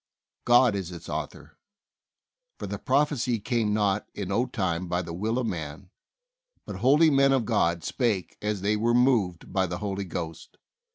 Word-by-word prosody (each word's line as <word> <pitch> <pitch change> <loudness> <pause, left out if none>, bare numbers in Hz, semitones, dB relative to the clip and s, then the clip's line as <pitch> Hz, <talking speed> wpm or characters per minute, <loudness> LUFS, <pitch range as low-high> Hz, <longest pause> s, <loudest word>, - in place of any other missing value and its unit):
God 120 -1 +5
is 95 -3 -4
its 85 -1 -9
author. - - -6 1.0
"For - - -6
the - - -5
prophecy 130 -5 +1
came 110 -1 0
not 105 -1 0
in 100 -2 -4
old 125 +5 0
time 90 -5 -1
by 90 +1 -1
the 85 0 -7
will 110 +7 -1
of 130 - 0
man; 80 0 -5 0.7
but 95 - -6
holy 145 - +5
men 135 0 +4
of 130 -4 +2
God 85 -7 +1
spake 110 - -1
as 105 -2 -2
they 105 +2 +1
were 115 +3 +1
moved 115 -9 +1
by 95 -1 +1
the 90 0 -4
Holy 100 -1 -3
Ghost." 80 -2 -7
105 Hz, 170 wpm, -26 LUFS, 90-120 Hz, 1.0 s, God